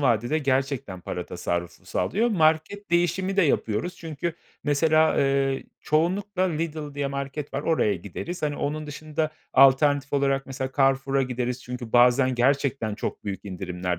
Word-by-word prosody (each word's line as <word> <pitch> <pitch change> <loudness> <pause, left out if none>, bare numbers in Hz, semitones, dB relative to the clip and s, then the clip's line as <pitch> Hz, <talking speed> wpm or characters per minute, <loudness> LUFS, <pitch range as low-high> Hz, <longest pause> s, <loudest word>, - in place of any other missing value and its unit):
vadede 120 +3 +2
gerçekten 135 -8 -1
para 90 0 -5
tasarrufu 85 -1 -4
sağlıyor. 225 +5 0
Market 165 +1 +1
değişimi 185 +3 +1
de 195 - +5
yapıyoruz 125 +1 0
çünkü 165 0 -4 0.3
mesela, 155 +2 +3
eee, 135 -1 +1 0.2
çoğunlukla 185 +6 0
Lidl 155 -4 -2
diye 145 -1 -1
market 140 +1 -5
var, 140 - -1
oraya 155 -11 +2
gideriz. 105 - -6
Hani, 145 -1 -1
onun 150 +1 -3
dışında 155 +1 -3 0.2
alternatif 140 +1 +5
olarak 135 -1 +1
mesela 135 0 -4
Carrefour'a 135 0 +2
gideriz 125 0 -3
çünkü 125 -2 -7
bazen 125 +2 +5
gerçekten 130 -3 +1
çok - - -5
büyük 100 0 -5
indirimler 90 -2 -3
140 Hz, 140 wpm, -25 LUFS, 125-155 Hz, 0.3 s, de